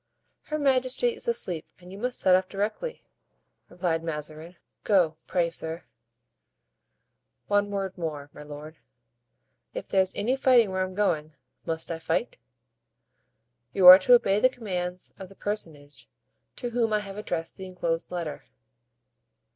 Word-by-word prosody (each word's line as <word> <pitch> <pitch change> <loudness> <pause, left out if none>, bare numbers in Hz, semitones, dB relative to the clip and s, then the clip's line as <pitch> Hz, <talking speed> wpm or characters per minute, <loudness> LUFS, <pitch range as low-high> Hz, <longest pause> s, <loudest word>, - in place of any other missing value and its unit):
"Her 305 - -3
majesty 265 - +2
is 470 +2 -8
asleep 180 - -1
and 180 0 -14
you 195 - -9
must 250 +2 -2
set 185 -1 +5
off 185 0 0
directly," 215 - -3 0.7
replied 175 -2 -1
Mazarin; 155 +2 -5 0.3
"go, 175 -7 +3
pray, 170 -2 0
sir——" 160 +1 -3 1.6
"One 205 0 +1
word 195 -2 -3
more, 150 -3 -5
my - - -11
lord; 150 +2 -10 1.0
if - - -5
there's 190 -1 +1
any 245 +6 +1
fighting 245 -6 +4
where 190 0 -1
I'm 185 0 -3
going, 155 -7 0 0.3
must 165 +1 -2
I 165 - -4
fight?" 235 +8 -2 1.3
"You 190 - +2
are 180 +1 +13
to 245 +6 +6
obey 200 -4 +2
the 255 - +5
commands 180 -7 -5
of 190 -1 -9
the 195 - -16
personage 160 -9 -5 0.5
to 245 -2 -4
whom 230 -2 +1
I 210 - +2
have 200 -1 -9
addressed 165 -6 -4
the 190 - -7
inclosed 170 -2 -3
letter." 170 -5 -5
185 Hz, 145 wpm, -27 LUFS, 165-210 Hz, 1.6 s, are